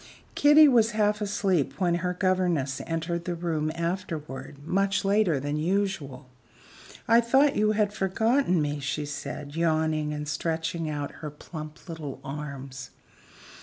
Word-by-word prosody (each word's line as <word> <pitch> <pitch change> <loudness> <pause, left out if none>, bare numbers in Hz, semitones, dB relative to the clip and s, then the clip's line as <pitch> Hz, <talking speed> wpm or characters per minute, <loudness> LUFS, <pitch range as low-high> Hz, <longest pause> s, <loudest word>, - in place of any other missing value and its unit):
Kitty 295 +1 +7
was 235 -4 +4
half 210 0 +2
asleep 195 -7 0
when 175 -3 +2
her 180 0 -1
governess 175 -8 0
entered 165 +1 -2
the 175 - -2
room 160 -2 -1
afterward, 160 -6 -4
much 195 +3 +1
later 195 -7 +3
than 145 +2 -2
usual. 160 -6 -1 0.8
"I 230 +1 +6
thought 270 +4 +3
you 215 0 +3
had 210 -1 +1
forgotten 210 - +2
me," 145 0 -2
she 145 +2 -2
said, 145 0 -6
yawning 155 -2 +1
and 150 0 -4
stretching 160 +2 -2
out 145 -1 -3
her 150 - -4
plump 155 +2 -10
little 155 -5 -6
arms. 135 -2 -7
165 Hz, 135 wpm, -27 LUFS, 150-195 Hz, 0.8 s, Kitty